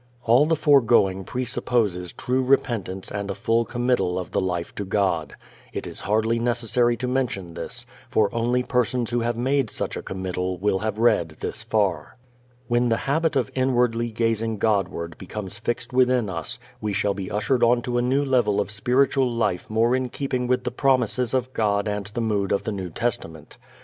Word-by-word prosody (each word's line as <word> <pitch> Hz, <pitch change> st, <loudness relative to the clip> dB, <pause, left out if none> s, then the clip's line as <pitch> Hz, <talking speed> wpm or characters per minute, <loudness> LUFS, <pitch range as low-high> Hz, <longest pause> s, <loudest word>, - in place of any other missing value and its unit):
All 120 Hz, +6 st, +5 dB
the 165 Hz, -, +3 dB
foregoing 115 Hz, -11 st, +4 dB
presupposes 115 Hz, -7 st, -1 dB
true 130 Hz, +1 st, -1 dB
repentance 110 Hz, -8 st, 0 dB
and 100 Hz, 0 st, -4 dB
a 100 Hz, -, -2 dB
full 115 Hz, +1 st, +1 dB
committal 120 Hz, -8 st, 0 dB
of 90 Hz, -, -5 dB
the -, -, +1 dB
life 90 Hz, -2 st, -2 dB
to 100 Hz, -, -4 dB
God. 95 Hz, -6 st, 0 dB, 0.4 s
It -, -, -4 dB
is -, -, -6 dB
hardly 110 Hz, +3 st, +1 dB
necessary 120 Hz, 0 st, +1 dB
to 125 Hz, +2 st, -3 dB
mention 120 Hz, -9 st, -2 dB
this, 120 Hz, +7 st, -6 dB, 0.2 s
for 110 Hz, -1 st, +2 dB
only 120 Hz, +2 st, +1 dB
persons 125 Hz, -1 st, 0 dB
who 120 Hz, -, +1 dB
have 120 Hz, 0 st, -1 dB
made 130 Hz, 0 st, +1 dB
such -, -, -3 dB
a -, -, -4 dB
committal 95 Hz, -1 st, -3 dB
will 95 Hz, +1 st, +1 dB
have 110 Hz, 0 st, -2 dB
read 85 Hz, -9 st, +2 dB
this -, -, -3 dB
far. 105 Hz, 0 st, -1 dB, 0.5 s
When 120 Hz, 0 st, +2 dB
the 115 Hz, -, +2 dB
habit 155 Hz, +3 st, +1 dB
of 130 Hz, -5 st, 0 dB
inwardly 120 Hz, -3 st, +1 dB
gazing 115 Hz, -1 st, 0 dB
Godward 95 Hz, -6 st, -1 dB
becomes 95 Hz, 0 st, -6 dB
fixed 120 Hz, +1 st, -3 dB
within 125 Hz, -4 st, +3 dB
us 80 Hz, -5 st, -3 dB, 0.2 s
we 105 Hz, -1 st, -2 dB
shall 100 Hz, +1 st, +1 dB
be 95 Hz, -1 st, -5 dB
ushered 110 Hz, +6 st, 0 dB
onto 120 Hz, +1 st, +2 dB
a -, -, +2 dB
new 135 Hz, +3 st, +1 dB
level 120 Hz, -6 st, +2 dB
of 100 Hz, -, -1 dB
spiritual 130 Hz, +4 st, +2 dB
life 115 Hz, -6 st, -1 dB
more 115 Hz, +3 st, +2 dB
in 130 Hz, -1 st, -1 dB
keeping 130 Hz, -1 st, -2 dB
with 125 Hz, 0 st, +1 dB
the 125 Hz, -, -2 dB
promises 125 Hz, -1 st, +1 dB
of 130 Hz, 0 st, -1 dB
God 100 Hz, -2 st, +1 dB
and 105 Hz, -1 st, -3 dB
the 110 Hz, +3 st, -4 dB
mood 105 Hz, -4 st, 0 dB
of 100 Hz, -, +1 dB
the -, -, -2 dB
New 95 Hz, -3 st, -4 dB
Testament. 80 Hz, -6 st, -4 dB
115 Hz, 185 wpm, -24 LUFS, 100-125 Hz, 0.5 s, All